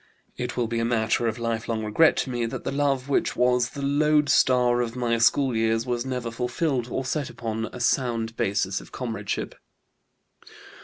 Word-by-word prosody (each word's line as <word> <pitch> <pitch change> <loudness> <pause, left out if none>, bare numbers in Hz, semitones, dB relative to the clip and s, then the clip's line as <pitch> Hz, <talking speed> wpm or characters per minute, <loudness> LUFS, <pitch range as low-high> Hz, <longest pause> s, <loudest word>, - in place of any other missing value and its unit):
It 125 0 -4
will 120 - +1
be 115 0 -2
a - - 0
matter 115 0 +1
of 110 - -2
lifelong 115 -1 -2
regret 155 +10 +4
to 130 - -1
me 120 -1 -1
that - - -6
the - - -2
love 140 -2 0
which 140 - 0
was 125 -1 +2
the 140 - -7
lodestar 140 -4 +3
of 115 -1 -3
my 120 -2 0
school 130 +2 +3
years 115 +1 +1
was 120 0 -2
never 125 -3 -3
fulfilled 125 +2 -1
or 130 - -3
set 140 +1 -2
upon 110 -1 -4
a - - -8
sound 115 -2 0
basis 95 -2 0
of - - -15
comradeship. 110 -5 -4
120 Hz, 175 wpm, -25 LUFS, 115-130 Hz, -, regret